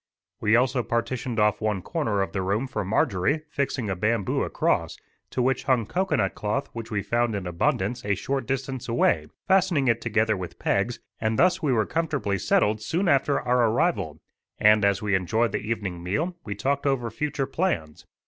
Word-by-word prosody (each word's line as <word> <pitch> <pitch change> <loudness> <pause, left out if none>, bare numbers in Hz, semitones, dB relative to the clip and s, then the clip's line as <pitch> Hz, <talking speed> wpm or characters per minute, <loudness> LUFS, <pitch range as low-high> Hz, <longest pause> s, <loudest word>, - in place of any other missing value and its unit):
We 110 +1 +3
also 125 +1 +2
partitioned 120 0 -2
off 105 0 +2
one 105 -4 -1
corner 110 - 0
of - - -5
the 95 - -2
room 100 +7 0
for 130 - -3
Marjorie, 100 - +1
fixing 135 -5 -1
a 95 - -1
bamboo 105 +2 0
across, - - 0 0.3
to 125 - -1
which 130 +1 0
hung 130 -5 +2
cocoanut 175 - 0
cloth 105 0 -2
which 115 -1 -6
we 105 -3 -2
found 120 -2 0
in 100 -2 -4
abundance 95 +6 -1
a 100 0 +1
short 135 +5 -3
distance 135 -2 -3
away, 80 -9 +2 0.2
fastening 180 -8 +3
it 115 -1 +2
together 110 -1 +1
with 90 -2 -7
pegs, - - 0 0.2
and 110 0 0
thus 180 +4 +3
we 150 -4 +1
were 110 -4 +2
comfortably 140 - -1
settled 105 +4 +2
soon 175 - -1
after 140 -1 +3
our 125 -2 +3
arrival; 110 - 0 0.4
and, 105 0 +5
as 100 0 +2
we 105 -1 0
enjoyed 100 +5 +1
the - - -1
evening 105 -5 -3
meal, 150 - -1
we 100 - -5
talked 140 +6 -1
over 120 -4 0
future 145 +2 -2
plans. 130 - -2
115 Hz, 185 wpm, -25 LUFS, 100-135 Hz, 0.4 s, and